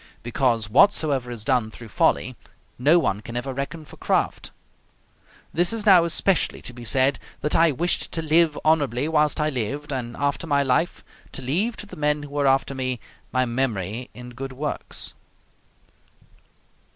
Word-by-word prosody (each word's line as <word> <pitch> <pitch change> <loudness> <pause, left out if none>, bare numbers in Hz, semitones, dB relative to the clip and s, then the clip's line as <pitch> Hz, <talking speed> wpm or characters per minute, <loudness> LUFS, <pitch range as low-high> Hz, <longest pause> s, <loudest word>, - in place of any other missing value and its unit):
Because 120 -2 0
whatsoever 140 - +3
is 115 -3 -6
done 125 -5 +2
through 115 +1 -12
folly, - - +1 0.4
no 150 +7 +5
one 105 - 0
can 120 +2 -6
ever 130 +2 -3
reckon 150 +4 -5
for - - -14
craft. - - -1 1.0
This 175 +2 +2
is 225 -2 -2
now 185 -5 +7
especially 175 +2 +1
to 125 - -7
be 120 0 -10
said: 130 +4 +2 0.2
that 150 - -1
I 165 -1 +5
wished 170 +6 -1
to 165 - -1
live 160 0 +3
honorably 145 -4 +2
whilst 150 -2 +2
I 155 0 +1
lived, 140 +4 -3
and 120 -2 -4
after 145 +3 -1
my 140 -2 +2
life, 135 +6 0 0.3
to 135 - -5
leave 190 - 0
to - - -7
the 205 - -11
men 150 0 +1
who 145 - -9
were 145 0 0
after 135 +1 +2
me, 130 -2 -2 0.3
my 130 0 +2
memory 115 -2 -2
in 125 0 -9
good 135 +2 -7
works. 145 +3 -4
140 Hz, 165 wpm, -24 LUFS, 125-155 Hz, 1.0 s, now